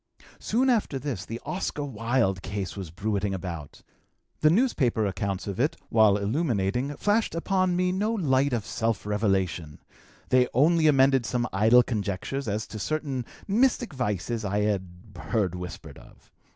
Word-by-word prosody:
"Soon 250 Hz, +5 st, +1 dB
after 225 Hz, -, +1 dB
this 130 Hz, -9 st, -4 dB
the 115 Hz, +1 st, -5 dB
Oscar 165 Hz, -5 st, -3 dB
Wilde 115 Hz, -6 st, 0 dB
case 95 Hz, -1 st, -4 dB
was 95 Hz, -5 st, -6 dB
bruiting 100 Hz, +2 st, -2 dB
about. 85 Hz, -6 st, -7 dB, 0.6 s
The 155 Hz, -, +5 dB
newspaper 155 Hz, -, +2 dB
accounts 100 Hz, -1 st, -2 dB
of 100 Hz, 0 st, -5 dB
it, 145 Hz, +5 st, +1 dB
while 110 Hz, -3 st, +5 dB
illuminating, 120 Hz, -, -1 dB
flashed 210 Hz, +1 st, +1 dB
upon 185 Hz, +1 st, +1 dB
me 180 Hz, 0 st, +1 dB
no 205 Hz, +4 st, 0 dB
light 140 Hz, -10 st, +2 dB
of 115 Hz, -4 st, -1 dB
self 110 Hz, -4 st, -2 dB
revelation; 95 Hz, -7 st, -1 dB, 0.5 s
they 125 Hz, -1 st, +4 dB
only 160 Hz, +4 st, +4 dB
amended 135 Hz, -3 st, +4 dB
some 120 Hz, +3 st, 0 dB
idle 110 Hz, +5 st, +6 dB
conjectures 110 Hz, +4 st, -3 dB
as 105 Hz, +1 st, -2 dB
to 110 Hz, -, -8 dB
certain 135 Hz, +2 st, -2 dB, 0.2 s
mystic 240 Hz, -, +2 dB
vices 115 Hz, -2 st, -2 dB
I 100 Hz, +1 st, 0 dB
had 100 Hz, -3 st, 0 dB, 0.3 s
heard 95 Hz, -1 st, -1 dB
whispered 90 Hz, -1 st, -8 dB
of. -, -, -19 dB
115 Hz, 150 wpm, -26 LUFS, 100-150 Hz, 0.6 s, idle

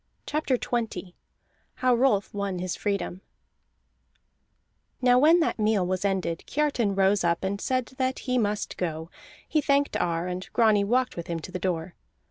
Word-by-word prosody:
CHAPTER 295 Hz, -4 st, 0 dB
XX 225 Hz, -7 st, -3 dB, 0.6 s
HOW 255 Hz, -1 st, +2 dB
ROLF 235 Hz, -5 st, +2 dB
WON 200 Hz, -2 st, -2 dB
HIS 180 Hz, 0 st, -3 dB
FREEDOM 200 Hz, -3 st, -2 dB, 1.8 s
Now 250 Hz, -1 st, +5 dB
when 325 Hz, +5 st, +6 dB
that 320 Hz, -, 0 dB
meal 210 Hz, -3 st, +2 dB
was 185 Hz, +1 st, -1 dB
ended, 190 Hz, -4 st, -1 dB
Kiartan 270 Hz, -9 st, 0 dB
rose 195 Hz, 0 st, +3 dB
up 170 Hz, +1 st, +1 dB
and 200 Hz, +1 st, -2 dB
said 255 Hz, -1 st, 0 dB
that 260 Hz, 0 st, 0 dB
he 250 Hz, -1 st, +1 dB
must 210 Hz, -2 st, -2 dB
go; 160 Hz, -2 st, -3 dB, 0.4 s
he 310 Hz, -, +1 dB
thanked 280 Hz, -1 st, +1 dB
Ar, 170 Hz, 0 st, -1 dB
and 180 Hz, +1 st, -5 dB
Grani 215 Hz, -3 st, +4 dB
walked 250 Hz, +5 st, +1 dB
with 170 Hz, -, -6 dB
him 170 Hz, -1 st, -2 dB
to 185 Hz, -, -9 dB
the 185 Hz, -, -4 dB
door. 175 Hz, -2 st, -2 dB
205 Hz, 160 wpm, -26 LUFS, 180-250 Hz, 1.8 s, when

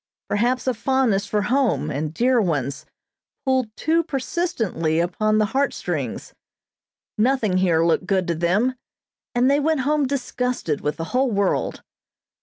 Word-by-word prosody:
Perhaps 245 Hz, +5 st, +1 dB
a 255 Hz, -, +1 dB
fondness 230 Hz, -4 st, +1 dB
for 210 Hz, 0 st, 0 dB
home, 225 Hz, -, +1 dB
and 150 Hz, +2 st, -2 dB
dear 245 Hz, +7 st, +2 dB
ones, 145 Hz, -, -2 dB, 0.6 s
pulled 260 Hz, -3 st, +2 dB
too 330 Hz, +2 st, +2 dB
persistently 250 Hz, -, -1 dB
upon 215 Hz, +5 st, +1 dB
the 215 Hz, -, +3 dB
heartstrings; 275 Hz, +1 st, -2 dB, 0.9 s
nothing 225 Hz, -5 st, +2 dB
here 170 Hz, -3 st, +3 dB
looked 170 Hz, +2 st, +1 dB
good 190 Hz, -2 st, +1 dB
to 170 Hz, -, 0 dB
them, 185 Hz, +10 st, +1 dB, 0.6 s
and 245 Hz, +1 st, +3 dB
they 280 Hz, +1 st, +4 dB
went 310 Hz, -1 st, +1 dB
home 290 Hz, +1 st, +1 dB
disgusted 250 Hz, -, -2 dB
with 150 Hz, +1 st, -2 dB
the 165 Hz, -, -3 dB
whole 260 Hz, +1 st, +2 dB
world. 200 Hz, -3 st, 0 dB
225 Hz, 140 wpm, -22 LUFS, 175-265 Hz, 0.9 s, they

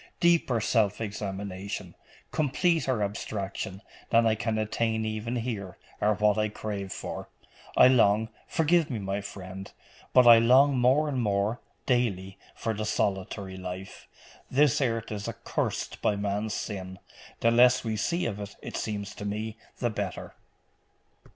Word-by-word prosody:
Deeper 170 Hz, -9 st, +3 dB
self 105 Hz, -2 st, +1 dB
examination, 100 Hz, -3 st, -5 dB, 0.4 s
completer 150 Hz, -, +1 dB
abstraction, 100 Hz, -1 st, -4 dB, 0.3 s
than 115 Hz, 0 st, +4 dB
I 110 Hz, -, +4 dB
can 110 Hz, 0 st, -1 dB
attain 110 Hz, +1 st, 0 dB
even 110 Hz, +2 st, -3 dB
here, 110 Hz, -6 st, -4 dB, 0.2 s
are 105 Hz, 0 st, +3 dB
what 105 Hz, +1 st, +3 dB
I 105 Hz, 0 st, +1 dB
crave 100 Hz, -2 st, -5 dB
for. -, -, -6 dB, 0.5 s
I 125 Hz, -, +9 dB
long 110 Hz, -3 st, +4 dB, 0.2 s
forgive 165 Hz, 0 st, +2 dB
me, 125 Hz, -, -2 dB
my 100 Hz, 0 st, -2 dB
friend 95 Hz, -1 st, -8 dB, 0.4 s
but 125 Hz, -1 st, +6 dB
I 115 Hz, -1 st, +10 dB
long 130 Hz, +4 st, +5 dB
more 130 Hz, +5 st, +4 dB
and 135 Hz, -4 st, -1 dB
more, 105 Hz, +2 st, 0 dB, 0.3 s
daily, 100 Hz, -7 st, 0 dB, 0.2 s
for 115 Hz, -, -2 dB
the 110 Hz, 0 st, -3 dB
solitary 95 Hz, -2 st, -2 dB
life. 95 Hz, +1 st, -7 dB, 0.4 s
This 145 Hz, +2 st, +3 dB
earth 115 Hz, -4 st, -1 dB
is 105 Hz, -1 st, -4 dB
accursed -, -, -3 dB
by 105 Hz, -, +2 dB
man's 105 Hz, +1 st, -2 dB
sin: 95 Hz, -3 st, -5 dB, 0.4 s
the 115 Hz, -, +4 dB
less 125 Hz, +1 st, +5 dB
we 110 Hz, -2 st, -2 dB
see 170 Hz, -, 0 dB
of 105 Hz, -7 st, -3 dB
it, 100 Hz, 0 st, -7 dB
it -, -, -5 dB
seems 100 Hz, -2 st, -4 dB
to -, -, -8 dB
me, 105 Hz, +2 st, -3 dB, 0.2 s
the 120 Hz, -2 st, 0 dB
better. 100 Hz, -3 st, -4 dB
110 Hz, 145 wpm, -28 LUFS, 100-120 Hz, 0.5 s, I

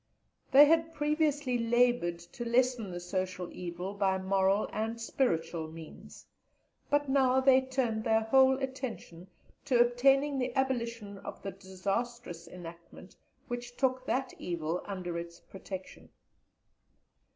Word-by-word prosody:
They 285 Hz, +2 st, +9 dB
had 325 Hz, +1 st, +2 dB
previously 295 Hz, -4 st, +1 dB
laboured 240 Hz, -6 st, +2 dB
to 175 Hz, +7 st, -9 dB
lessen 240 Hz, -2 st, +1 dB
the 175 Hz, -1 st, -5 dB
social 185 Hz, 0 st, -4 dB
evil 180 Hz, +2 st, -5 dB
by 195 Hz, -2 st, +1 dB
moral 190 Hz, +1 st, +2 dB
and 225 Hz, +2 st, -2 dB
spiritual 165 Hz, -9 st, -1 dB
means, 160 Hz, 0 st, -12 dB, 0.6 s
but 290 Hz, 0 st, +2 dB
now 265 Hz, -1 st, +3 dB
they 265 Hz, 0 st, +5 dB
turned 260 Hz, -4 st, -1 dB
their 220 Hz, 0 st, +3 dB
whole 265 Hz, +4 st, +5 dB
attention 260 Hz, -10 st, -6 dB, 0.4 s
to 255 Hz, -4 st, +2 dB
obtaining 270 Hz, +4 st, +3 dB
the 250 Hz, -1 st, -2 dB
abolition 235 Hz, -6 st, -2 dB
of -, -, -9 dB
the 195 Hz, -, -4 dB
disastrous 195 Hz, 0 st, -4 dB
enactment 170 Hz, -1 st, -11 dB, 0.3 s
which 245 Hz, -1 st, -6 dB
took 255 Hz, -1 st, 0 dB
that 265 Hz, 0 st, -1 dB
evil 170 Hz, -1 st, -3 dB
under 180 Hz, -4 st, -4 dB
its 170 Hz, 0 st, -9 dB
protection. 190 Hz, -1 st, -9 dB
230 Hz, 125 wpm, -31 LUFS, 185-260 Hz, 0.6 s, They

